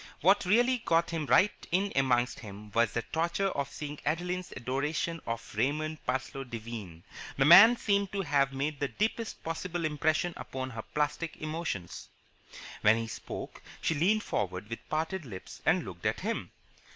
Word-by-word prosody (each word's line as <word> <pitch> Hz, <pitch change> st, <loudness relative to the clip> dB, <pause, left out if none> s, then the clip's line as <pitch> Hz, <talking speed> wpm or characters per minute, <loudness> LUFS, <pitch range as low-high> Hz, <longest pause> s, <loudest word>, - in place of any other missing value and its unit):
What 195 Hz, +4 st, +4 dB
really 240 Hz, +6 st, +4 dB
got 170 Hz, -5 st, +2 dB, 0.2 s
right 205 Hz, +3 st, +3 dB
in 195 Hz, +3 st, +1 dB
amongst 125 Hz, -2 st, +2 dB
him 105 Hz, -1 st, -10 dB
was 115 Hz, 0 st, +3 dB
the 115 Hz, -, -1 dB
torture 170 Hz, +4 st, 0 dB
of 140 Hz, -6 st, -3 dB
seeing 150 Hz, -1 st, -6 dB
Adeline's 180 Hz, +4 st, -2 dB
adoration 150 Hz, +6 st, -2 dB
of 115 Hz, 0 st, -4 dB
Raymond 155 Hz, +7 st, -1 dB
Parsloe 130 Hz, +2 st, -2 dB
Devine. 110 Hz, -8 st, -7 dB, 0.3 s
The 135 Hz, -, +4 dB
man 200 Hz, -, +10 dB
seemed 200 Hz, -3 st, +1 dB
to 200 Hz, -, 0 dB
have 140 Hz, -3 st, +2 dB
made 140 Hz, +2 st, -2 dB
the 140 Hz, -, 0 dB
deepest 220 Hz, -, -2 dB
possible 165 Hz, +1 st, -3 dB
impression 155 Hz, +3 st, +1 dB
upon 130 Hz, 0 st, -5 dB
her 110 Hz, -1 st, -5 dB
plastic 150 Hz, +5 st, -2 dB
emotions. 155 Hz, -, -4 dB, 0.7 s
When 105 Hz, +1 st, +5 dB
he 115 Hz, -, -2 dB
spoke, 110 Hz, -, -7 dB, 0.2 s
she -, -, +1 dB
leaned 195 Hz, +8 st, +2 dB
forward 95 Hz, +1 st, -3 dB
with 115 Hz, -, -3 dB
parted 160 Hz, +4 st, -1 dB
lips 100 Hz, -9 st, -9 dB
and -, -, +3 dB
looked -, -, -4 dB
at -, -, -1 dB
him. -, -, -2 dB
150 Hz, 160 wpm, -30 LUFS, 120-175 Hz, 0.7 s, man